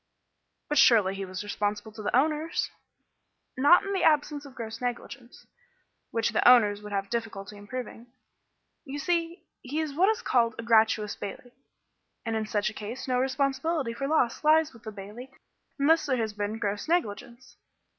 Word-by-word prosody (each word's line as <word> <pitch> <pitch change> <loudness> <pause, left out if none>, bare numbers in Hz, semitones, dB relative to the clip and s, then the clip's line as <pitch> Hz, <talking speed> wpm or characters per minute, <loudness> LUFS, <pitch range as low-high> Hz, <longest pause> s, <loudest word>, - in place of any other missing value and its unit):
"But 295 -1 +2
surely 210 -7 +5
he 195 0 -5
was 185 +1 -6
responsible 205 +1 -3
to 215 - -10
the 210 - -1
owners." 305 +4 0 0.8
"Not 290 +7 +6
in 395 - -3
the 385 - 0
absence 295 -2 +2
of 270 - -15
gross 225 0 -7
negligence, 245 0 -6 0.6
which 230 -1 0
the - - +2
owners 210 -5 +5
would 210 0 -9
have 195 +1 -3
difficulty 215 -3 -4
in 205 0 -13
proving. 245 -1 -7 0.8
You 285 -1 -6
see, 335 +3 -1 0.2
he 285 +5 -4
was 310 -3 -2
what 365 +7 +3
is 440 +2 -1
called 230 -3 +2
a 230 - -5
gratuitous 220 -2 +3
bailee, 245 +5 -8 0.7
and 225 -1 -1
in 220 -1 -2
such 210 0 0
a - - -15
case 215 +6 -7
no 250 -1 +1
responsibility 270 +1 0
for 275 +4 -3
loss 280 -5 +1
lies 310 -1 +4
with 230 - -16
the 215 - -5
bailee 210 +6 -10 0.5
unless 310 +2 +3
there 260 -2 +1
has 220 -2 -2
been 210 +1 -3
gross 205 +1 -3
negligence." 245 -6 -3
240 Hz, 175 wpm, -27 LUFS, 210-290 Hz, 0.8 s, Not